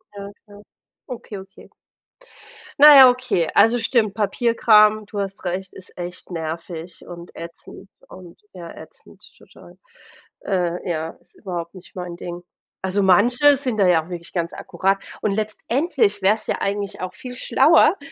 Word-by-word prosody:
Ja, 200 0 -8
klar. 205 -1 -15 0.5
Okay, 235 -5 -8
okay. 190 0 -15 1.1
Naja, 280 -3 +10
okay. 245 -9 -1
Also 240 +2 +4
stimmt, 225 -3 +1
Papierkram,- 215 -1 +3
du 205 0 -6
hast 195 -1 -5
recht- 185 +1 -4
ist 185 - -14
echt 175 0 -8
nervig 165 0 -7
und 170 0 -11
ätzend 170 +3 -11 0.2
und 180 -2 -14
ja, 175 -3 -10
ätzend, - - -16
total. - - -18 0.7
Äh, 180 -2 -2
ja, 160 -1 -3
ist - - -23
überhaupt 175 -4 -7
nicht 185 - -15
mein 180 -2 -6
Ding. 175 0 -8 0.4
Also, 190 +2 0
manche 245 +10 +4
sind 255 -5 -3
da 195 - +4
ja 170 -3 +3
auch - - -16
wirklich 170 -1 -8
ganz 170 -2 -3
akkurat 195 +1 -1 0.2
und 210 - 0
letztendlich 215 - -1
wäre 195 +3 +4
es 220 - -10
ja - - -2
eigentlich 200 0 -3
auch 185 0 -6
viel 250 -1 -9
schlauer, 315 +8 +4
195 Hz, 150 wpm, -21 LUFS, 175-225 Hz, 1.1 s, Naja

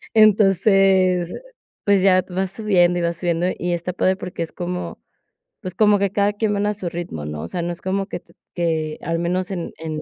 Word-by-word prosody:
Entonces, 195 -4 +4 0.5
pues, 200 -2 +4
ya 185 -2 +5
vas 185 +1 -2
subiendo 180 -5 +2
y - - -1
vas 170 0 -1
subiendo 170 0 0
y 175 - -2
está 175 +1 -3
padre 185 +1 +2
porque 180 -3 -6
es 165 - -8
como 180 0 -5 0.6
pues, 185 -2 -6
como 210 -2 +4
que 200 -1 +1
cada 205 0 +1
quien 210 0 -1
van 205 0 0
a 210 - +1
su 190 -3 -4
ritmo, 170 - -6
¿no?, 75 0 -5
o - - -5
sea, 175 - -3
no 175 - -2
es 170 - -13
como 195 +1 -2
que 195 - -5
t - - -25 0.2
que 160 -3 -1
al 165 0 -1
menos 180 +2 -1
en 175 -3 -4
en 155 -1 -4
180 Hz, 215 wpm, -21 LUFS, 170-195 Hz, 0.6 s, ya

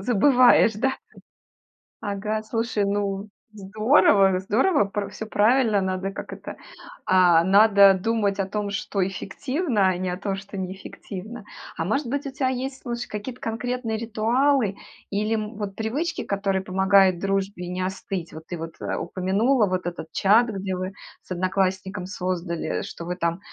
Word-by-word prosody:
забываешь, 245 0 +5
да? 265 +3 +1 1.1
Ага, 210 +1 -2
слушай, 225 -1 -1
ну, 200 0 -2 0.2
здорово, 200 -2 +3
здорово, 235 - +2
пр 200 0 -3
всё - - -6
правильно, 220 0 +3
надо, 190 0 -2
как 195 - -8
это, - - -8 0.5
а, 175 -3 +5
надо 200 0 +6
думать 200 0 0
о 195 - -1
том, 205 0 -3
что 200 -2 -1
эффективно, 240 - -1
а 185 -1 +2
не 185 0 -2
о 180 - -3
том, 195 +1 -3
что 195 +1 -8
неэффективно. 190 +3 -7 0.3
А 165 - -2
может 260 - -1
быть, 285 +3 -2
у 275 - -5
тя 265 0 0
есть, 260 +1 -4
слушай, 240 0 -4
какие-то 235 +4 -7
конкретные 230 0 -3
ритуалы 230 +1 +1 0.4
или, 210 +2 0
м, 215 +1 -4
вот 200 -2 -5
привычки, 280 +11 -2
которые 195 -1 -1
помогают 190 -1 +4
дружбе 195 -2 -2
не 180 +1 -3
остыть? 190 -2 -5
Вот 160 0 -10
ты 175 - -5
вот, 165 0 -7
э, - - -2
упомянула 210 +5 +1
вот 185 -1 -2
этот 175 -2 -5
чат, 215 +8 +4
где 195 -2 -3
вы 185 +1 -4 0.3
с - - -26
одноклассником 185 +1 -1
создали, 180 -3 -3
что 170 - -8
вы 175 +1 -3
там 170 -1 -1
200 Hz, 155 wpm, -24 LUFS, 190-225 Hz, 1.1 s, надо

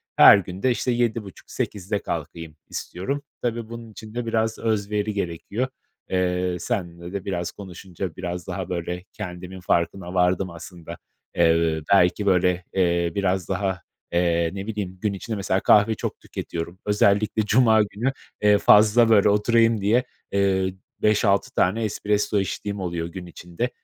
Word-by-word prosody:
her 100 - +9
gün 95 0 -6
de, 130 - +4
işte, 125 +1 0
7.30-8.00'de 105 -3 -2
kalkayım 80 -2 -6
istiyorum. 135 +11 -4 0.2
Tabii 115 -2 -2
bunun 115 -1 -8
için 110 0 -11
de 120 0 -3
biraz 110 -1 0
özveri 105 -1 -1
gerekiyor. 100 +6 -3 0.4
Eee, 90 -1 0
seninle 85 0 -4
de 100 -2 -4
biraz 90 -3 -2
konuşunca 95 -2 -7
biraz 90 -1 -5
daha - - -4
böyle 90 0 -3
kendimin 90 -2 -7
farkına 90 +1 -1
vardım 90 0 +2
aslında. 85 0 -10 0.4
Eee, 80 -1 +3
belki, 95 +2 +4
böyle, 90 -2 +2
eee, 85 -2 +1
biraz 95 -2 0
daha, 95 -2 -1 0.3
eee, 85 -1 +2
ne 100 +1 -6
bileyim, 100 -4 -4
gün 105 -2 0
içinde, 110 +3 -5
mesela, 95 -1 0
kahve 105 +3 +4
çok - - -5
tüketiyorum, 85 +2 -6
özellikle 105 +1 +2
cuma 110 0 +5
günü, 110 +6 -2 0.3
eee, 105 0 +5
fazla, 110 +3 +6
böyle, 105 -2 +5
oturayım 115 +1 +3
diye, 115 +5 +3 0.3
eee, 95 -1 +1 0.3
5-6 105 -2 +2
tane 105 +5 +2
espresso 105 -1 0
içtiğim 100 +1 -3
oluyor 85 -3 -3
gün 90 +1 -8
içinde. 90 +6 -4
95 Hz, 145 wpm, -24 LUFS, 90-105 Hz, 0.4 s, her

